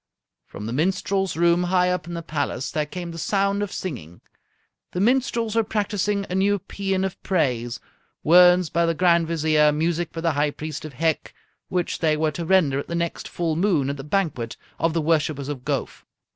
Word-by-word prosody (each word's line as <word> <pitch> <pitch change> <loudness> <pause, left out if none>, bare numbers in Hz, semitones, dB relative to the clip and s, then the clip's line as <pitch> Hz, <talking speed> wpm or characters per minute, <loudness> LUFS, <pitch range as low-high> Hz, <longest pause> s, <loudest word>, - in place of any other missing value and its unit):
From 105 - -8
the 115 - -3
minstrels' 185 +4 0
room 170 +1 +3
high 180 0 +2
up 180 -3 -2
in 170 - -5
the 170 - -5
palace 145 -4 -3
there 150 -1 -1
came 175 +2 -6
the 165 - -7
sound 200 +2 +1
of 205 -1 -3
singing. 90 - -6 0.7
The 180 - -2
minstrels 230 0 +1
were 225 - +3
practising 205 -1 -1
a - - -5
new 200 +2 +2
paean 195 0 -2
of 190 - -5
praise 125 -10 0 0.4
words 180 +1 +6
by 170 0 +2
the 165 - +1
Grand 170 -1 +3
Vizier, 155 -2 +3
music 165 +2 -1
by 165 - -5
the 165 0 +2
High 145 0 +1
Priest 155 +1 -6
of 155 - -8
Hec 160 +4 -1 0.3
which 180 -2 -1
they 155 -2 +2
were 155 0 +1
to 170 +3 -5
render 160 -7 +3
at - - -6
the 170 - -3
next 170 0 -2
full 165 -2 -2
moon 165 -6 +1
at 140 - -6
the 135 - -7
banquet 150 - -1 0.2
of 165 -1 +1
the 165 - +1
worshippers 150 -3 0
of 135 -4 -5
Gowf. - - -3
170 Hz, 200 wpm, -23 LUFS, 150-185 Hz, 0.7 s, words